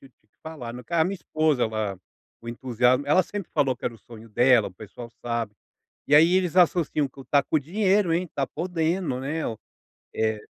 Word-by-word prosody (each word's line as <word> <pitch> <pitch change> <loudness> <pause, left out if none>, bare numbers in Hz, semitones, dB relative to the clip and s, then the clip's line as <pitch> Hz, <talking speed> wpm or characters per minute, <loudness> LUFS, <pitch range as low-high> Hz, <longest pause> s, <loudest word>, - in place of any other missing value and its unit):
que 135 - -16 0.3
falar, 140 -8 -7
eh, 125 - -9
a 165 -2 +3
minha 195 +3 -2
esposa 155 -6 0
ela 110 -4 -3 0.4
o 115 - -10
entusiasmo 125 +2 +1
ela 150 +6 +4
sempre 200 0 -7
falou 135 -3 +2
que - - -13
era 120 - -2
o - - -16
sonho 115 +1 -13
dela, 120 0 +4
o - - -18
pessoal 110 +4 -10 0.2
sabe. 115 -3 -2 0.5
E 145 - +3
aí 165 +4 +6
eles 185 -2 +1
associam 165 -5 +3
que: 135 0 -13
"Tá 140 -1 +4
com 155 - 0
o - - +2
dinheiro, 190 +3 +1
hein, 175 +1 0
tá 140 -1 0
podendo, 165 -4 -2
né, 155 +4 -3
o" 110 - -5 0.6
eh 110 -1 0
140 Hz, 200 wpm, -25 LUFS, 120-165 Hz, 0.6 s, aí